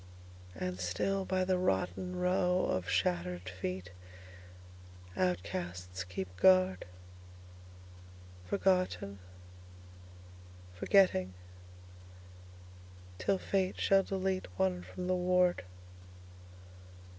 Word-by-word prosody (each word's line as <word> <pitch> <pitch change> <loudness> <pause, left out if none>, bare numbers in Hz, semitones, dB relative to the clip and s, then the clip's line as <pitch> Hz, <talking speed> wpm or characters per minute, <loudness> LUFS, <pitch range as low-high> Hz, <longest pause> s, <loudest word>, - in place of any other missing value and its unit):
And 90 +1 -4
still 190 - -1
by 185 0 0
the 185 -1 +1
rottenRow 180 - 0
of 95 -1 -2
shattered 90 0 0
feet, 90 0 -5 1.2
Outcasts 90 0 -2
keep 90 0 -6
guard. 185 - +4 1.6
Forgotten, 185 - 0 1.5
Forgetting, 95 - +3 1.8
till 195 - +1
fate 190 -1 -1
shall 195 0 +4
deleteOne 185 - -1
from 95 - -7
the 185 - +1
ward. 180 0 +2
100 Hz, 70 wpm, -32 LUFS, -, 1.8 s, guard